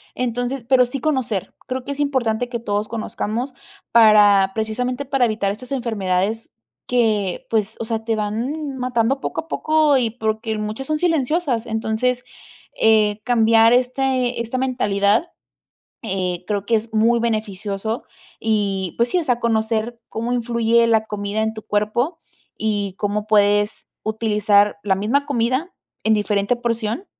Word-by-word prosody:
Entonces, 245 +1 -2
pero 255 -2 +5
sí 255 +2 -5
conocer. 255 - -1
Creo 255 0 -3
que 280 - -5
es 280 - -5
importante 245 -5 0
que 240 -1 -4
todos 205 -2 -2
conozcamos 230 +3 -3 0.4
para 205 -4 +6
precisamente 250 +5 -2
para 270 -2 +2
evitar 215 -3 0
estas 250 +6 -7
enfermedades 220 -3 -1 0.4
que, 215 -6 +1
pues, 220 -1 0
o 230 - -2
sea, 225 -1 -3
te 225 -1 0
van 255 +8 -3
matando 250 +1 0
poco - - -3
a 320 - -20
poco 310 -3 +3
y 235 -3 +1
porque 220 -1 -2
muchas 215 +5 -4
son 310 0 0
silenciosas. 310 -6 +1
Entonces, 225 +2 -1 0.6
eh, 215 -1 +4
cambiar 230 -1 +5
este 255 -1 +1
esta 235 +2 -3
mentalidad, 230 - +1 0.7
eh, 185 -4 -2
creo 205 -2 -2
que 225 +2 +2
es 220 +1 -4
muy 230 +2 +4
beneficioso 215 -1 -2 0.3
y 200 -5 -1
pues 235 +1 +3
sí. 365 - +2
O 340 - -1
sea, 245 -4 0
conocer 225 0 0
cómo 230 +2 -3
influye 235 -1 +2
la 220 -1 +2
comida 205 0 -2
en 220 0 -1
tu 215 - -8
cuerpo 215 +10 -1 0.4
y 205 -3 -1
cómo 210 0 -1
puedes 205 0 +2 0.2
utilizar 210 -2 +2
la 195 - +3
misma 230 +9 0
comida 260 +5 0 0.3
en 220 - +4
diferente 205 +1 +1
porción 235 - -2
225 Hz, 150 wpm, -21 LUFS, 210-250 Hz, 0.7 s, para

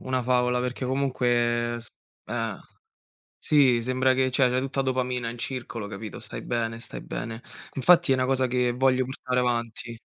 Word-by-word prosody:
una 130 -1 -1
favola. 125 0 +2
perché 125 +1 -3
comunque 120 -3 +1
s 120 +1 -9 0.4
eh. - - -2 0.8
Sì, 135 -6 +4
sembra 130 +1 +2
che 130 0 +2
cioè 130 -1 +3
c'hai 125 - +1
tutta 135 +1 -3
a - - +2
dopamina 125 -2 -1
in 120 - -7
circolo, 120 -3 -5
capito, 105 0 -7
stai - - -6
bene 115 -1 -2
stai - - -8
bene. 115 +1 -5 0.3
Infatti 170 +3 +5
è - - +5
'na 130 0 +1
cosa 130 0 +1
che 125 0 +1
voglio 130 +1 +2
portare 125 -1 -2
avanti. 120 -1 -2
125 Hz, 170 wpm, -26 LUFS, 120-130 Hz, 0.8 s, Infatti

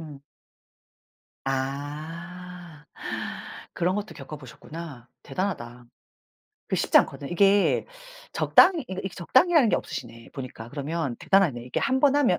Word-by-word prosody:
음. 150 -4 -9 1.2
아. 155 +5 -5 0.9
그런 180 +2 +1
것도 205 -4 -4
겪어 150 0 -8
보셨구나. 140 -1 -10 0.2
대단하다. 125 -7 -4 0.8
그게 - - 0
쉽지 - - +5
않거든. 140 - -1
이게 200 +3 +4 0.5
적당히 345 -6 +5
그러니까 190 -5 -5
이게 190 - -6
적당히라는 260 - +4
게 - - +4
없으시네 115 -1 -7
보니까. 125 -3 -7
그러면 145 -2 -3
대단하네. 175 -12 +3
이게 125 - -3
1번 275 +1 +3
하면 245 -12 +3
165 Hz, 285 characters per minute, -26 LUFS, 135-195 Hz, 1.2 s, 쉽지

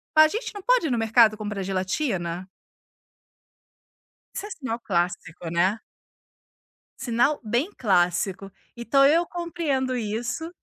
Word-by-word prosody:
"A 310 0 +8
gente 445 +8 -4
não 405 -2 -9
pode - - +3
ir - - -2
no 240 - +1
mercado 225 -1 +4
comprar 210 -2 -4
gelatina"? 185 - -2 1.9
Isso 410 - -4
é - - -8
sinal 250 -8 -4
clássico, 175 -4 -2
né. 185 +6 +1 1.2
Sinal 260 +3 +1
bem 240 - 0
clássico, 190 -1 +1 0.3
então 260 +4 +3
eu 330 +4 +4
compreendo 310 -7 -2
isso. 240 +8 -3
230 Hz, 120 wpm, -25 LUFS, 190-295 Hz, 1.9 s, A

